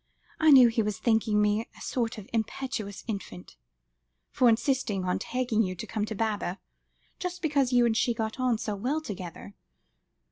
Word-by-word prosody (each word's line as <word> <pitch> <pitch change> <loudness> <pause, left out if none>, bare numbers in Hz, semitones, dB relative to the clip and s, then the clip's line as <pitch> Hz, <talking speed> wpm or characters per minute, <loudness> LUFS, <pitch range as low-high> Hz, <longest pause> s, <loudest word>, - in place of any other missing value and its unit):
I 315 - +5
knew 260 -4 +9
he 225 0 +1
was 210 -2 -2
thinking 220 -1 +2
me 210 +2 +1
a - - -14
sort 235 -2 -2
of 210 -2 -9
impetuous 220 -3 -3
infant, 195 - -6 0.8
for 250 - +4
insisting 225 -5 0
on 180 - 0
asking 245 -3 +1
you 185 -3 -1
to 170 - -6
come 210 -2 -2
to 215 - -5
Baba, 205 -3 -2 0.6
just 360 -1 -4
because 280 -4 +2
you 245 -1 +5
and 230 -2 +2
she 235 +1 +1
got 220 +2 -3
on 250 -3 +2
so 210 -1 -3
well 255 +10 -1
together. 190 - -8
225 Hz, 175 wpm, -28 LUFS, 210-250 Hz, 0.8 s, knew